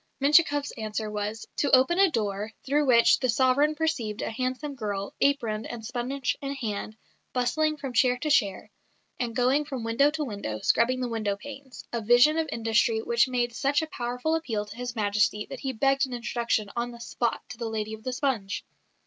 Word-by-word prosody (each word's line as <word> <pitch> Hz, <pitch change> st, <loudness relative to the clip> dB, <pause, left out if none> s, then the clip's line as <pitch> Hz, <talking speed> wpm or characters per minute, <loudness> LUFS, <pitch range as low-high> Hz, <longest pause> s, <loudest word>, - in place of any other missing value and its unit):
Menshikoff's 290 Hz, 0 st, +4 dB
answer 215 Hz, 0 st, -3 dB
was 210 Hz, +1 st, -4 dB
"to 285 Hz, -, +1 dB
open 265 Hz, +8 st, +3 dB
a 390 Hz, -1 st, +6 dB
door, 210 Hz, -4 st, -2 dB
through 290 Hz, +2 st, +1 dB
which 235 Hz, -2 st, +6 dB
the 255 Hz, -, 0 dB
sovereign 260 Hz, +5 st, +3 dB
perceived 250 Hz, -10 st, -2 dB
a -, -, -3 dB
handsome 255 Hz, +5 st, -3 dB
girl, 205 Hz, -5 st, -4 dB
aproned, 230 Hz, -7 st, +1 dB
and 230 Hz, -2 st, -7 dB
sponge 250 Hz, +3 st, -2 dB
in 280 Hz, 0 st, -3 dB
hand, 215 Hz, -3 st, -4 dB, 0.4 s
bustling 305 Hz, +5 st, +1 dB
from 270 Hz, -3 st, -6 dB
chair 250 Hz, +1 st, +3 dB
to 305 Hz, +4 st, -2 dB
chair, 200 Hz, -8 st, +1 dB, 0.5 s
and 235 Hz, -2 st, -2 dB
going 260 Hz, +4 st, +3 dB
from 265 Hz, -5 st, -5 dB
window 230 Hz, +6 st, +3 dB
to 300 Hz, 0 st, -3 dB
window, 200 Hz, -, -4 dB
scrubbing 255 Hz, +3 st, +2 dB
the 250 Hz, -, -1 dB
window 215 Hz, -4 st, -2 dB
panes" 275 Hz, +2 st, -10 dB
a 235 Hz, -, -1 dB
vision 245 Hz, +8 st, +5 dB
of 320 Hz, -2 st, -1 dB
industry 225 Hz, 0 st, +2 dB
which 235 Hz, +2 st, +3 dB
made 240 Hz, -2 st, -1 dB
such 280 Hz, +5 st, +1 dB
a 315 Hz, -, -7 dB
powerful 250 Hz, +6 st, -2 dB
appeal 235 Hz, -11 st, -1 dB
to 210 Hz, +1 st, -11 dB
His 245 Hz, 0 st, -5 dB
Majesty 210 Hz, 0 st, +1 dB
that 270 Hz, -, -6 dB
he 265 Hz, -, -2 dB
begged 270 Hz, +2 st, +2 dB
an 255 Hz, -, -8 dB
introduction 235 Hz, -3 st, -1 dB
on 240 Hz, 0 st, -1 dB
the 235 Hz, -1 st, -11 dB
spot 235 Hz, 0 st, -2 dB
to 245 Hz, -, -9 dB
the 230 Hz, -2 st, -3 dB
lady 220 Hz, -1 st, -3 dB
of 220 Hz, 0 st, -9 dB
the 255 Hz, -, -2 dB
sponge. 250 Hz, -7 st, -2 dB
245 Hz, 195 wpm, -27 LUFS, 220-275 Hz, 0.5 s, a